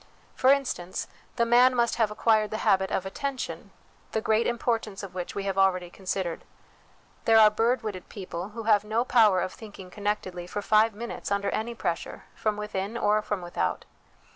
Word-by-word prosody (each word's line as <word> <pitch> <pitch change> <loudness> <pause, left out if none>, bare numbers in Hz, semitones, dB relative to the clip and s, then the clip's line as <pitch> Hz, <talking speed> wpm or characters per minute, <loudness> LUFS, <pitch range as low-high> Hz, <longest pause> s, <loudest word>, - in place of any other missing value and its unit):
For 260 - +5
instance, 250 -10 -1 0.3
the 235 -2 +2
man 245 +2 +5
must 235 -1 +1
have 225 -3 +2
acquired 215 0 +2
the 215 - -3
habit 190 -2 +3
of 190 - -1
attention, 265 +7 -4 0.4
the 220 - +1
great 220 +1 +1
importance 225 -4 -2
of 195 - -8
which 180 -1 -5
we 200 - -2
have 195 -1 -1
already 185 -2 +2
considered. 185 -3 -3 0.8
There 225 0 +6
are 215 -1 +8
bird 235 +3 +1
witted 195 -4 -6
people, 185 -2 -6
who 225 +2 -7
have 210 -2 +4
no 220 +3 0
power 215 -7 +4
of 185 +1 -3
thinking 200 -4 -11
connectedly 190 -4 -3
for 205 +3 -4
five 215 +1 +3
minutes 235 +2 -6
under 200 0 0
any 235 +2 -3
pressure, 170 -6 -3
from 215 -1 -1
within 210 +1 -3
or 215 -1 +2
from 205 -3 -3
without. 130 - -2
210 Hz, 180 wpm, -27 LUFS, 190-225 Hz, 0.8 s, are